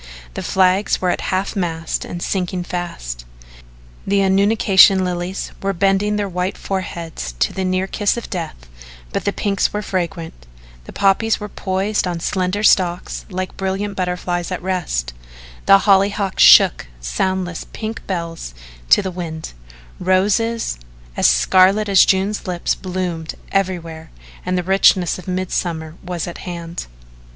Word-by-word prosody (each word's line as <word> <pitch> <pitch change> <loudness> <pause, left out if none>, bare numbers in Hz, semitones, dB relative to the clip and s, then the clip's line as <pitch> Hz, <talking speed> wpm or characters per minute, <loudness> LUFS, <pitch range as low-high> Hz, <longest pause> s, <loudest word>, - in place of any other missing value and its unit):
The - - -5
flags 190 +2 +2
were 180 -1 +1
at - - -2
half 190 +3 -1
mast 165 -4 -2
and 175 - -6
sinking 180 -1 -2
fast. 170 - -5 0.8
The 200 0 +3
annunciation 195 -1 +5
lilies 180 +1 -3
were 195 0 0
bending 195 +3 +1
their 205 -1 -1
white 180 0 -3
foreheads 170 - -5
to - - +1
the 190 - -2
near 185 0 0
kiss 205 +3 0
of 235 - -5
death, 165 - -6 0.5
but - - -2
the 200 - +2
pinks 200 -1 0
were 210 0 -3
fragrant, 170 - -4 0.4
the - - -10
poppies 200 +3 +2
were 210 0 -6
poised 195 +1 -1
on 175 -1 -3
slender 185 +3 -1
stalks 180 -4 +2
like 185 -1 -4
brilliant 195 +1 -2
butterflies 180 -1 -2
at 185 - -2
rest, 160 - -2 0.5
the 195 - +9
hollyhocks 195 -1 +2
shook - - +7
soundless 180 - -2
pink 220 0 -5
bells 165 - -4 0.3
to - - +6
the 190 - -3
wind, 165 -3 -6 0.5
roses 205 - +1 0.4
as - - +4
scarlet 185 - +4
as 195 -2 +6
June's 195 +2 0
lips 175 -1 0
bloomed 180 -3 -4 0.2
everywhere 170 -5 -2 0.4
and 180 0 +1
the 180 - -1
richness 185 -1 +3
of 185 - -12
mid 185 0 -2
summer 160 -3 -2
was 180 -2 -4
at 175 - -7
hand. 170 -1 -6
185 Hz, 145 wpm, -19 LUFS, 175-195 Hz, 0.8 s, the